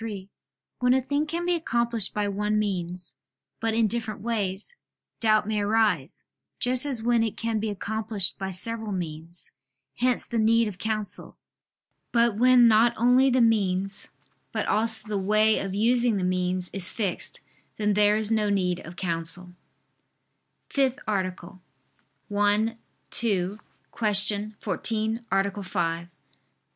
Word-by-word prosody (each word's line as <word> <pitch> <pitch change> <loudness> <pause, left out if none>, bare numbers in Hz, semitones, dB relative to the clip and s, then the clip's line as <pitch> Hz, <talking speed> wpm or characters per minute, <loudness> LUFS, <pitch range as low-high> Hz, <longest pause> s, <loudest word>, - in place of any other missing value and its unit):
3: 200 -4 -6 0.5
When 250 +1 +3
a 265 - +2
thing 285 +3 -1
can 340 +2 -2
be 355 - +2
accomplished 235 - 0
by 210 -1 -1
one 210 +1 -1
means, 180 -4 -3 0.5
but 225 0 -1
in 230 0 +3
different 220 -2 -2
ways, 210 - -1 0.4
doubt 215 -2 +3
may 215 -1 0
arise, 205 -8 0 0.3
just 255 +3 +3
as 250 -6 -2
when 235 0 +3
it 225 -2 -2
can 225 -1 -1
be 220 +1 -2
accomplished 210 -1 -1
by 190 -1 -3
several 220 +3 0
means: 165 -2 -5 0.5
hence 250 0 +1
the 235 - -2
need 225 +1 +3
of 195 -3 -7
counsel. 215 -1 -1 0.7
But 235 -2 +3
when 245 +1 +6
not 230 +2 +4
only 250 +3 +4
the 255 -1 +3
means, 195 -3 +1 0.4
but - - -2
also 225 +1 0
the 210 -2 -1
way 215 +3 +3
of 195 -1 -4
using 235 +1 +2
the 190 - -2
means, 180 0 -1
is 190 -2 +1
fixed, 200 -6 -3 0.4
then 210 -1 +1
there 210 +1 +4
is 215 0 -1
no 215 -2 +2
need 180 -3 0
of 170 +2 -10
counsel. 175 0 -3 1.2
________________________ - - -16
FIFTH 265 -2 +2
ARTICLE 185 -2 -3 0.7
[I 205 +2 +2 0.4
II, 200 -3 +1 0.3
Q. 210 -1 +1
14, 220 +4 -2
Art. 185 -4 -1
215 Hz, 140 wpm, -26 LUFS, 190-230 Hz, 1.2 s, when